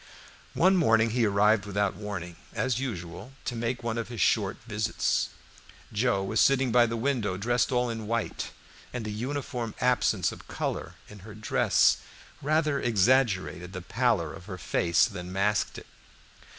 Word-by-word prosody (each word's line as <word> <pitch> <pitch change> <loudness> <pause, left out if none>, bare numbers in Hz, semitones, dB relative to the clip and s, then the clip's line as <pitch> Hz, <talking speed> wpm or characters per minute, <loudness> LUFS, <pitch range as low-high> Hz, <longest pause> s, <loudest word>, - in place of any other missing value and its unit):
One 190 +2 +4
morning 115 -8 +4
he 115 -1 +2
arrived 105 +1 +3
without 100 -1 0
warning, 95 -4 -6 0.2
as 125 -2 0
usual, 105 -1 -6
to 120 - -2
make 120 +1 -2
one 115 0 -1
of 115 - -3
his 120 -1 -7
short 100 -4 +2
visits. 105 -2 0 0.6
Joe 105 -3 +1
was 110 +3 -1
sitting 135 -2 +4
by 120 0 +5
the 115 0 -3
window 115 -7 0
dressed 120 +6 +1
all 125 -1 +2
in 115 -2 -4
white, 115 0 -2 0.4
and 120 -3 -4
the 105 - -3
uniform 125 0 -4
absence 125 -1 +2
of - - -12
color - - -4
in 105 - -12
her 105 +2 -11
dress 110 -1 +3 0.4
rather 150 0 +1
exaggerated 100 - +2
the 90 - -5
pallor 110 -7 +1
of 95 -2 -11
her 95 -3 -6
face 85 0 +2
than 90 -5 -6
masked 100 +2 0
it. - - -9
110 Hz, 160 wpm, -28 LUFS, 100-125 Hz, 0.6 s, by